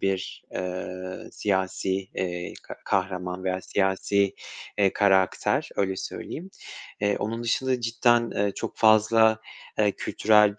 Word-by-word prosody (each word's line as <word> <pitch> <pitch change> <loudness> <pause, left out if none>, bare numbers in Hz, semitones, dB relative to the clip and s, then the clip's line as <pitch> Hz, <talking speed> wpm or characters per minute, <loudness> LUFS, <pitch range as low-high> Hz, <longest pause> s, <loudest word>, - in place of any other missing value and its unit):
bir, 95 -1 -2
eee, 90 0 -5
siyasi, 95 -1 0 0.2
eee, 90 -1 -3
ka - - -9
kahraman 90 -1 -1
veya 95 0 0
siyasi, 100 +1 +1 0.4
eee, 100 -2 +4
karakter, 95 -2 +2
öyle 95 -1 0
söyleyeyim. 180 - -6 0.5
Eee, 100 0 +2
onun 115 +3 -3
dışında 130 +2 0
cidden, 120 0 +3
eee, 100 0 0
çok - - -5
fazla, 110 0 +5 0.4
eee, 105 -2 +4
kültürel 105 -1 +3
100 Hz, 120 wpm, -26 LUFS, 95-110 Hz, 0.5 s, fazla